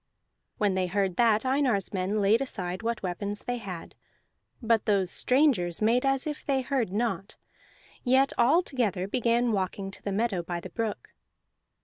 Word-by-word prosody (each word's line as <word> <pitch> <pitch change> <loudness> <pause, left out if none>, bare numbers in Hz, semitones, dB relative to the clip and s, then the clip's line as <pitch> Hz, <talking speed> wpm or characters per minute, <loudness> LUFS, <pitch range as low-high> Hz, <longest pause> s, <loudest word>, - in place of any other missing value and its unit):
When 205 -2 +1
they 185 -1 0
heard 190 -1 0
that, 225 -1 +3
Einar's 255 -8 +1
men 195 +3 -1
laid 215 +5 +4
aside 185 -8 -4
what 230 -1 -3
weapons 200 +3 -3
they 245 0 -2
had; 185 -6 -8 0.7
but 230 -2 +1
those 195 -4 +2
strangers 250 - +2
made 235 +5 +2
as 270 -1 +1
if 300 -1 -5
they 270 -2 0
heard 255 -6 -1
not, 205 -2 -2 0.7
yet 265 +2 +3
all 290 +10 +4
together 205 - -1
began 235 +2 +1
walking 195 -1 -2
to - - -10
the 200 - -3
meadow 200 -2 0
by 170 0 -4
the 175 +1 -9
brook. 230 - -4
215 Hz, 160 wpm, -28 LUFS, 190-250 Hz, 0.7 s, laid